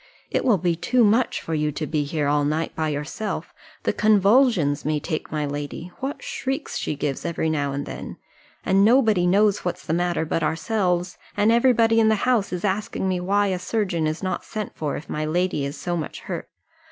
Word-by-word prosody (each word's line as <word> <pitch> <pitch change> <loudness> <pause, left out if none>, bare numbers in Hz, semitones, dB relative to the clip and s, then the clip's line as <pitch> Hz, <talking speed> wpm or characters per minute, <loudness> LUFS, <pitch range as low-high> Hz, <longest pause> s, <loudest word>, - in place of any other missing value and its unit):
It - - +1
will 235 -6 +4
be 175 -1 0
too 245 +8 +2
much 225 +4 +3
for 165 - -5
you 150 -1 0
to 155 - -3
be 150 -2 -1
here 145 0 -1
all 145 0 +2
night 155 +3 -1
by 160 -1 -1
yourself. 150 +9 -4 0.3
The - - +1
convulsions 205 - +3
may 150 +1 0
take 155 +1 -4
my 150 -1 -1
lady. 145 +4 -5
What 275 +2 -4
shrieks 265 +1 -3
she - - -2
gives 140 -1 -3
every 165 -2 -1
now 145 -2 0
and 140 +1 -3
then! - - -7 0.5
and 195 +1 +4
nobody 220 -6 +4
knows 205 +2 +4
what's 180 - -4
the 160 - -1
matter 175 -1 0
but 165 +1 -1
ourselves; 180 +2 0 0.2
and 205 +2 +4
every 235 +2 +5
body 225 -1 +4
in 220 - +4
the 220 - +4
house 245 -6 +2
is 180 +2 -3
asking 205 0 -1
me 185 -1 0
why 200 +3 +1
a 185 -1 -1
surgeon 180 -6 -1
is 155 +4 -3
not 185 - -2
sent 215 -2 -5
for, 150 -2 -2
if 155 - -9
my 155 - -3
lady 170 -1 0
is 140 +2 -5
so 175 -1 -2
much 160 -4 -5
hurt. - - -6
180 Hz, 210 wpm, -23 LUFS, 155-215 Hz, 0.5 s, every